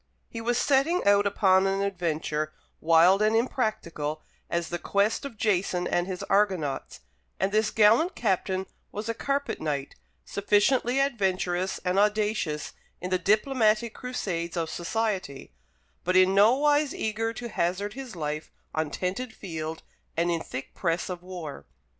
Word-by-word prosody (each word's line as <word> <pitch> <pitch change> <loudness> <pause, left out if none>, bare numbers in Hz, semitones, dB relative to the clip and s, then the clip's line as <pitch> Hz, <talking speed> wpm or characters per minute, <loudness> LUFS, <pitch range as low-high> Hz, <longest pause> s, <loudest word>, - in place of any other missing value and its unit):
He 230 - -6
was 240 +1 0
setting 290 +7 +2
out 200 0 +5
upon 190 -1 +3
an 195 +1 0
adventure 160 -5 -2 0.3
wild 170 +5 +5
and 215 +1 +3
impracticable 190 - -1 0.3
as 170 0 -1
the 175 - -3
quest 200 +8 +1
of 255 -6 -7
Jason 185 -4 +1
and 175 +1 0
his 185 -2 -4
Argonauts; 185 - 0 0.4
and 195 - +1
this 215 +1 +2
gallant 225 - +4
captain 190 -3 0 0.3
was 210 +2 -5
a 230 - 0
carpet 280 +4 -2
knight, 145 -3 -2 0.3
sufficiently 230 +6 +2
adventurous 190 -8 0
and 180 +2 +2
audacious 210 -7 0 0.3
in 180 +1 -5
the 185 - +2
diplomatic 215 +2 +2
crusades 180 -9 -4
of 165 -1 -1
society, 185 - -3 0.5
but 185 +1 0
in 185 +1 +6
nowise 280 +8 +4
eager 220 +1 -1
to 240 +1 -6
hazard 190 +2 -1
his 260 -5 -8
life 150 -1 -4 0.2
on 155 -1 -1
tented 190 - -3
field 160 -6 -6 0.3
and 170 +1 +2
in 165 -1 -1
thick 130 -3 -7
press 170 +1 -1
of 175 -1 -6
war. 175 - -8
195 Hz, 145 wpm, -27 LUFS, 170-225 Hz, 0.5 s, in